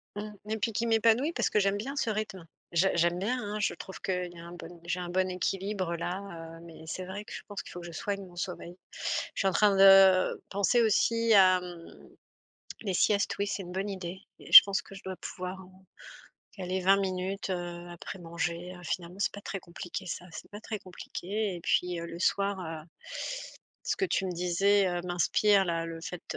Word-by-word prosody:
Mmh 210 Hz, +1 st, -5 dB, 0.2 s
et 220 Hz, -, 0 dB
puis 225 Hz, +1 st, -1 dB
qui 230 Hz, +2 st, 0 dB
m'épanouit 230 Hz, +7 st, +3 dB
parce -, -, +1 dB
que -, -, +2 dB
j'aime 200 Hz, 0 st, +2 dB
bien 265 Hz, +7 st, -4 dB
ce 255 Hz, -, 0 dB
rythme. 215 Hz, -4 st, -3 dB, 0.3 s
Je 175 Hz, +3 st, +3 dB
j'aime 170 Hz, +1 st, +2 dB
bien 245 Hz, +6 st, -1 dB
hein, 210 Hz, 0 st, -4 dB
je 210 Hz, -, +1 dB
trouve 190 Hz, -, -9 dB
qu'il 180 Hz, -2 st, -2 dB
y 170 Hz, -, -12 dB
a 170 Hz, -, -10 dB
un 170 Hz, -, -9 dB
bon 175 Hz, 0 st, -10 dB
j'ai 180 Hz, +1 st, -1 dB
un 175 Hz, -, -4 dB
bon 185 Hz, +1 st, +1 dB
équilibre-là, 180 Hz, -2 st, -3 dB
heu, -, -, -13 dB
mais 165 Hz, -1 st, -12 dB
c'est 185 Hz, +4 st, -4 dB
vrai 200 Hz, +3 st, -6 dB
que -, -, -10 dB
je -, -, -6 dB
pense 205 Hz, -1 st, -5 dB
qu'il -, -, -12 dB
faut 175 Hz, -, -7 dB
que 175 Hz, -, -9 dB
je -, -, -8 dB
soigne 200 Hz, +4 st, -3 dB
mon 175 Hz, -1 st, -15 dB
sommeil. 175 Hz, 0 st, -5 dB, 0.6 s
Je -, -, -6 dB
suis 195 Hz, -, +2 dB
en -, -, +3 dB
train 205 Hz, +2 st, +4 dB
de, 195 Hz, -1 st, +7 dB
penser 200 Hz, +5 st, +3 dB
aussi 230 Hz, +1 st, +3 dB
à, 185 Hz, -2 st, +7 dB
mmh, 175 Hz, -2 st, -9 dB, 0.9 s
les 200 Hz, -4 st, -2 dB
siestes, 200 Hz, +3 st, +2 dB
oui, 200 Hz, -, +1 dB
c'est 200 Hz, -, -3 dB
une 175 Hz, -, -9 dB
bonne 190 Hz, +3 st, -2 dB
idée 185 Hz, -1 st, -5 dB, 0.2 s
et -, -, -13 dB
je -, -, +14 dB
pense 200 Hz, -1 st, -1 dB
que 195 Hz, -, -13 dB
je 195 Hz, -, -10 dB
dois 190 Hz, 0 st, -5 dB
pouvoir, 185 Hz, +1 st, -6 dB
heu, 180 Hz, -, -14 dB, 0.9 s
caler 185 Hz, -1 st, -2 dB
20 195 Hz, +2 st, +5 dB
minutes, 190 Hz, +1 st, -2 dB
heu, 175 Hz, -1 st, -4 dB
après 175 Hz, +3 st, -8 dB
manger, 170 Hz, +1 st, -4 dB
heu, 180 Hz, -, -12 dB
finalement, 175 Hz, +2 st, -4 dB
c'est 200 Hz, -, +1 dB
pas 205 Hz, -, -7 dB
très 195 Hz, -, -5 dB
compliqué 175 Hz, +2 st, -7 dB
ça, 175 Hz, 0 st, -5 dB
c'est 155 Hz, -, -10 dB
pas 205 Hz, +1 st, -8 dB
très 215 Hz, -1 st, -5 dB
compliqué 195 Hz, +2 st, -4 dB
et 170 Hz, -, -8 dB
puis, 180 Hz, -1 st, +1 dB
heu, 170 Hz, -, -5 dB
le 170 Hz, 0 st, -7 dB
soir, 200 Hz, +2 st, +1 dB
heu, 160 Hz, -3 st, -6 dB, 1.0 s
ce -, -, 0 dB
que 390 Hz, -, +1 dB
tu 205 Hz, -, 0 dB
me 185 Hz, -, -2 dB
disais, 190 Hz, +3 st, +3 dB
heu, 175 Hz, -1 st, -1 dB
m'inspire 195 Hz, +3 st, +3 dB
là, 165 Hz, -2 st, -1 dB
le 165 Hz, 0 st, -6 dB
fait 175 Hz, +1 st, -7 dB
185 Hz, 220 wpm, -30 LUFS, 175-200 Hz, 1.0 s, je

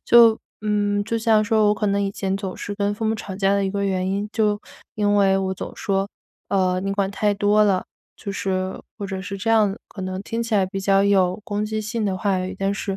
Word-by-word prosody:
就 230 Hz, -2 st, +7 dB, 0.3 s
嗯， 205 Hz, -1 st, +1 dB
就 230 Hz, -, -1 dB
像 220 Hz, -1 st, +3 dB
说 215 Hz, -1 st, +3 dB
我 210 Hz, -, +3 dB
可 210 Hz, 0 st, -1 dB
能 200 Hz, 0 st, +1 dB
以 195 Hz, -, 0 dB
前 195 Hz, -1 st, -2 dB
总 195 Hz, -2 st, -5 dB
是 205 Hz, -, -5 dB
跟 200 Hz, 0 st, 0 dB
父 220 Hz, +2 st, -4 dB
母 220 Hz, -, +1 dB
吵 195 Hz, -3 st, -6 dB
架 195 Hz, 0 st, +2 dB
的 200 Hz, -, +1 dB
一 190 Hz, -, -1 dB
个 200 Hz, 0 st, -1 dB
原 190 Hz, -1 st, 0 dB
因 200 Hz, +1 st, -1 dB
就 210 Hz, -2 st, +1 dB, 0.3 s
因 205 Hz, -1 st, +2 dB
为 195 Hz, -1 st, +4 dB
我 190 Hz, -1 st, -1 dB
总 -, -, -6 dB
说： 195 Hz, 0 st, -1 dB, 0.4 s
“呃， 185 Hz, -2 st, +1 dB
你 195 Hz, +1 st, -2 dB
管 200 Hz, -1 st, 0 dB
太 205 Hz, +1 st, +1 dB
多 205 Hz, +1 st, +3 dB
了。” 195 Hz, -3 st, +2 dB, 0.3 s
就 200 Hz, -, -6 dB
是 190 Hz, -1 st, -2 dB, 0.2 s
或 205 Hz, -, -5 dB
者 190 Hz, -1 st, -4 dB
是 195 Hz, +1 st, -5 dB
这 215 Hz, +4 st, -1 dB
样 210 Hz, -3 st, +3 dB
可 205 Hz, -, -10 dB
能 185 Hz, +1 st, -4 dB
听 230 Hz, +2 st, -3 dB
起 230 Hz, -1 st, -1 dB
来 195 Hz, -, +4 dB
比 190 Hz, +1 st, -5 dB
较 195 Hz, 0 st, +3 dB
有 195 Hz, -1 st, +2 dB
攻 210 Hz, -2 st, -2 dB
击 215 Hz, 0 st, -2 dB
性 215 Hz, +1 st, -2 dB
的 190 Hz, -2 st, 0 dB
话 195 Hz, 0 st, 0 dB
语， 185 Hz, +1 st, -3 dB
但 195 Hz, 0 st, 0 dB
是， 195 Hz, -1 st, -3 dB
200 Hz, 265 characters per minute, -22 LUFS, 195-210 Hz, 0.4 s, 就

